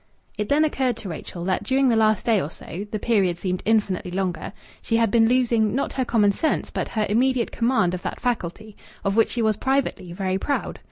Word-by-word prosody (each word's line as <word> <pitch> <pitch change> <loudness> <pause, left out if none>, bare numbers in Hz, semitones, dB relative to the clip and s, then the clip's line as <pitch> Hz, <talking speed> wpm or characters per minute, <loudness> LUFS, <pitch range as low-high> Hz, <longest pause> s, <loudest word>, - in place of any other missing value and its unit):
It 210 -1 -3
then 300 +2 +4
occurred 260 -5 0
to 200 - -7
Rachel 170 +1 -6
that 185 -1 0
during 270 0 +2
the 235 - +3
last 215 -2 +2
day 220 -4 +3
or 145 - -4
so 190 +4 -8
(the 215 - -2
period 195 -6 +1
seemed 180 0 -2
infinitely 210 -5 +1
longer) 185 -1 -3 0.3
she 225 - 0
had 230 -3 +2
been 225 0 +4
losing, 235 -3 +2
not 275 - -1
her 260 - -1
common 210 -4 +3
sense, 315 +10 -1
but - - -2
her 215 -2 -1
immediate 245 +3 +1
command 230 -7 +1
of 180 - -4
that - - -5
faculty, 215 -2 -3 0.3
of 195 0 +1
which 225 - +4
she 235 - -1
was, 215 -1 +2
privately, 265 -9 -1
very 190 +1 -2
proud. 285 +7 -2
215 Hz, 215 wpm, -23 LUFS, 190-245 Hz, 0.3 s, then